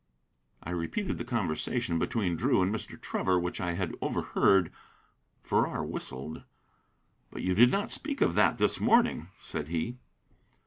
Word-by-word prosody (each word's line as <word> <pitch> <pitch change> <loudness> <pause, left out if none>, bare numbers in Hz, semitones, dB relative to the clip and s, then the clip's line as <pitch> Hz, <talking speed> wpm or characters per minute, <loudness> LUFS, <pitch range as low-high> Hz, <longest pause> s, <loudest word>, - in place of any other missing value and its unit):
I 85 - -5
repeated 90 - -2
the - - -2
conversation 85 -5 -1
between 95 -3 0
Drew 90 - +2
and 95 +3 0
Mr. 110 - -6
Trevor 95 -1 0
which 90 0 -3
I 85 -1 -1
had 90 -1 -2
overheard. 95 -4 +2 0.7
Farrar - - 0
whistled. 70 +5 -6 0.9
"But - - -7
you 95 - +1
did 120 +6 +7
not 200 +7 -1
speak 285 -2 -2
of - - +3
that - - +3
this - - +1
morning," 230 - +3
said 75 - -5
he. 85 +10 -2
90 Hz, 145 wpm, -29 LUFS, 85-115 Hz, 0.9 s, did